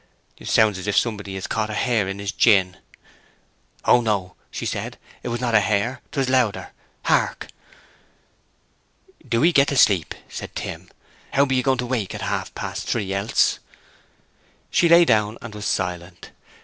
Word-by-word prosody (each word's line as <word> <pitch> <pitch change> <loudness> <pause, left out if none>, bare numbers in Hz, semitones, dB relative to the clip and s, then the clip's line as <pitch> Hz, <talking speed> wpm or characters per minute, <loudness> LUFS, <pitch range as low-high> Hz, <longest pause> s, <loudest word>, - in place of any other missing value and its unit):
"Sounds 105 -3 +3
as 95 - -7
if 105 - 0
somebody 100 -4 -1
had 95 - -5
caught 110 -1 -1
a 105 - -4
hare 115 -6 +1
in 95 +1 -4
his 100 -1 -4
gin." 95 -3 +3 1.1
"Oh 120 - +5
no," 100 -5 -1 0.2
said - - -4
she. - - -32 0.2
"It - - -6
was 120 0 -2
not 120 -2 -1
a 105 - +7
hare, 110 +5 0
'twas 135 -2 -1
louder. 125 -6 +1 0.3
Hark!" - - 0 1.8
"Do 115 +4 +2
'ee 175 - +5
get 140 -3 +4
to 140 - -1
sleep," 95 -9 +3
said - - -8
Tim. - - -6 0.4
"How 140 +1 +4
be 135 -1 0
you 130 - +2
going 130 0 +1
to 125 - -2
wake 120 -6 -2
at - - -6
half - - -2
past - - -5
three 100 -5 -1
else?" 100 +3 +1 1.1
She 170 - +3
lay 170 +1 +7
down 110 -3 +2
and 115 -2 -9
was 105 0 -7
silent. 90 -1 -3
110 Hz, 170 wpm, -22 LUFS, 100-125 Hz, 1.8 s, a